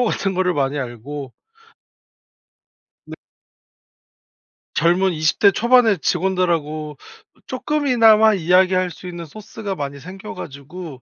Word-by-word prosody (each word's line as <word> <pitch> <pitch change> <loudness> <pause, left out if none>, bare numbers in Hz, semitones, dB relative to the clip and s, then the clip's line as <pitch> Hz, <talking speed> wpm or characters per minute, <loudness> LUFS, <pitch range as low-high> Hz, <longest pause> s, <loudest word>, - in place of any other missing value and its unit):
신조어 - - +3
같은 195 -3 -1
거를 180 0 +1
많이 140 -1 -1
알고 130 +2 -6 1.8
네. - - -8 1.6
젊은 180 +3 +2
20 155 -1 0
대 200 - +6
초반의 230 -2 +3
직원들하고 165 -5 -1 0.5
쪼끔이나마 250 -6 +3
이야기할 185 0 +2
수 180 - -11
있는 175 -1 -7
소스가 205 +3 -7
많이 140 -2 -5
생겨 190 +7 -9
가지고 145 0 -9
180 Hz, 245 characters per minute, -20 LUFS, 150-200 Hz, 1.8 s, 대